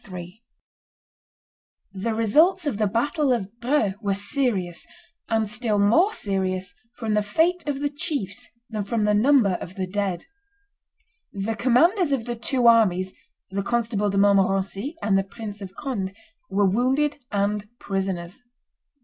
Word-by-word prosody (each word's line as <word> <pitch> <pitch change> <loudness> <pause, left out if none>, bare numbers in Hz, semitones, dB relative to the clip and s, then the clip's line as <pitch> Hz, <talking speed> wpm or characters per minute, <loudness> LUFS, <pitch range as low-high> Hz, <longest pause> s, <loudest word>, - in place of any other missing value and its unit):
] - - -29 1.9
The 220 +4 -2
results 315 - +3
of 255 -8 -2
the 215 - +3
battle 275 - +1
of 230 -1 -2
Dreux 235 -5 +1
were 200 -2 0
serious, 200 -5 -2 0.4
and 220 -1 +1
still 220 0 -1
more 235 - +4
serious 190 - -2 0.2
from 220 -2 -2
the 210 - +3
fate 325 +12 +1
of 280 -1 -2
the 290 - +1
chiefs 275 - -4 0.2
than 215 -2 -2
from 220 +1 -1
the 210 0 +3
number 215 -4 +4
of 185 - -8
the 190 - -2
dead. 190 -1 -2 1.1
The 205 +3 -3
commanders 290 - +3
of 255 -5 0
the 240 -1 -3
two 245 +1 -1
armies, 190 -5 +4 0.4
the 200 +1 -1
Constable 220 -1 0
de 200 - -1
Montmorency, 195 - +2
and 195 -2 +3
the - - 0
Prince 205 +1 -8
of 195 -1 -8
Conde, 200 -9 -4 0.3
were 200 +1 +2
wounded 260 +8 +1
and 205 +1 -1
prisoners. 190 -3 -3
210 Hz, 145 wpm, -24 LUFS, 195-255 Hz, 1.9 s, more